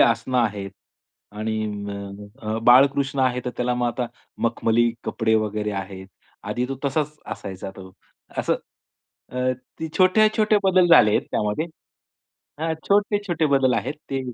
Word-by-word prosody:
आसनं 120 +2 +3
आहेत. 105 -4 -1 0.6
आणि 110 +1 -2 0.8
अ, 110 0 -2
बाळकृष्ण 135 +3 +5
आहे. 125 -1 +2
तर 125 - -2
त्याला 125 0 0
मग 125 0 0
आता 120 +1 -2 0.4
मखमली 115 0 +2
कपडे 110 -1 +1
वगैरे 105 -1 0
आहेत. 95 0 -10 0.4
आधी 125 +1 -2
तो 135 - -3
तसाच 150 +2 -1 0.2
असायचा 95 0 -7
तो. 95 -1 -11 0.5
असं - - +1 0.8
अ, 125 0 0 0.3
ते 160 - -3
छोटे-छोटे 215 +3 +4
बदल 185 -1 +5
झाले 135 -10 +7
आहेत - - 0
त्यामध्ये 105 +10 -1 0.9
हां. 160 0 0 0.2
छोटे-छोटे 200 -5 +2
बदल 130 -2 +3
आहेत, 130 +5 -2 0.2
ते 135 -1 -1
125 Hz, 135 wpm, -23 LUFS, 110-155 Hz, 0.9 s, झाले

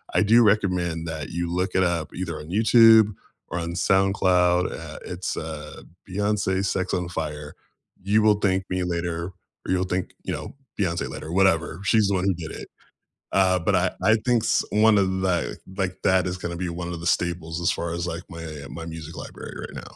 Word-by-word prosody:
I 90 - +5
do 115 +3 +6
recommend 90 -6 +1
that 80 -2 -5
you 85 0 -3
look 90 +1 -1
it 95 - +4
up, 85 -3 -1
either 85 -3 -4
on 75 +2 -10
YouTube 110 +1 +6 0.4
or 85 - -3
on 85 +1 -4
SoundCloud, 90 -1 +3
uh, 80 -1 -8
it's, 90 +1 -4
uh, 75 -1 -7 0.3
Beyonce's 100 -1 0
Sex 95 0 -1
on 90 -1 -1
Fire. 75 -3 -5 0.5
You 105 +2 +3
will 105 -1 +5
thank 95 -2 +1
me 90 0 -1
later, 85 -1 -2 0.4
or - - -1
you'll 90 0 +2
thank, 90 0 -2
you - - -3
know, - - -6 0.2
Beyonce 85 -4 0
later, 80 - -7
whatever. 85 -3 +2
She's 105 0 +3
the 100 - +1
one 90 +1 0
who 95 - +3
did 80 -2 -7
it. - - -8 0.7
Uh, 95 -1 +4
but 95 +2 +2
I 90 +1 +2
I 110 +4 +5
think 120 -2 +3
s 115 - +2
one 110 0 +5
of 95 -1 +1
that, 90 -3 0 0.2
like, 95 -2 -2
that 95 -1 +3
is 90 0 -3
gonna 85 -1 -4
be 90 0 -3
one 85 0 -5
of 85 - -6
the 85 - -6
staples 85 -1 -1
as 85 - +2
far 85 0 -2
as, 85 +1 -3
like, 85 0 -4
my 80 -4 -7
my 85 0 -7
music 80 -1 -8
library - - -8
right - - -8
now. - - -6
90 Hz, 205 wpm, -24 LUFS, 85-95 Hz, 0.7 s, do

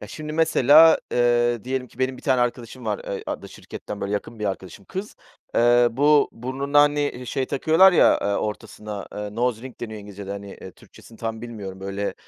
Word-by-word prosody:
Ya, - - -9
şimdi, 155 -1 -7
mesela, 160 0 +6
ııı, 120 -2 +2
diyelim 130 0 -3
ki, 120 - -22
benim 130 0 -1
1 - - -14
tane 130 -3 +2
arkadaşım 120 0 -3
var, 105 -2 -1
ııı, 100 - -5
adlı - - -5
şirketten, 105 - -9
böyle, 100 +1 -3
yakın 105 +2 -4
bir 105 - -4
arkadaşım, 95 0 -6
kız. 195 +3 -7 0.4
Eee, 120 +1 +5
bu, 145 +4 +4
burnuna, 135 +4 0
hani, 145 0 +3
eee, 135 -3 -3
şey 130 +2 -2
takıyorlar, 160 +8 +5
ya, - - +5
ııı, 100 0 0
ortasına, 105 -1 -5
ııı, 105 0 -6
nose 120 -1 0
ring 130 -1 -11
deniyor 110 -2 -6
İngilizcede, 100 -1 -9
hani, 100 0 -7
iii, 95 - -9
Türkçesini 115 - -17
tam 115 0 -4
bilmiyorum, 100 -5 -8
böyle, 100 +1 -3
120 Hz, 195 wpm, -23 LUFS, 105-135 Hz, 0.4 s, mesela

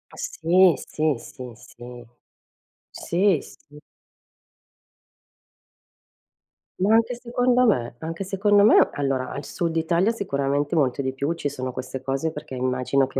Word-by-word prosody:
Sì, 175 +2 +3 0.2
sì, 155 -2 +1
sì, 125 0 -10
sì. 120 +1 -12 0.9
Sì, 180 -2 +1
sì. 150 0 -16 3.0
Ma 205 +4 +3
anche 230 +2 +2
secondo 245 +1 +1
me. 120 - 0
Anche 165 +4 -5
secondo 200 +2 +3
me. 215 - +6
Allora 135 -2 -2
al 140 - -6
sud 170 -2 -3
Italia 170 +5 +2
sicuramente 145 -7 -1
molto 140 -3 +1
di 130 0 -2
più: 140 +4 -2
ci 165 -3 -4
sono 130 -2 -5
queste 130 +1 -6
cose 135 +4 -2
perché 145 -3 -8
immagino 130 +1 0
che 135 - -5
150 Hz, 125 wpm, -23 LUFS, 130-190 Hz, 3.0 s, me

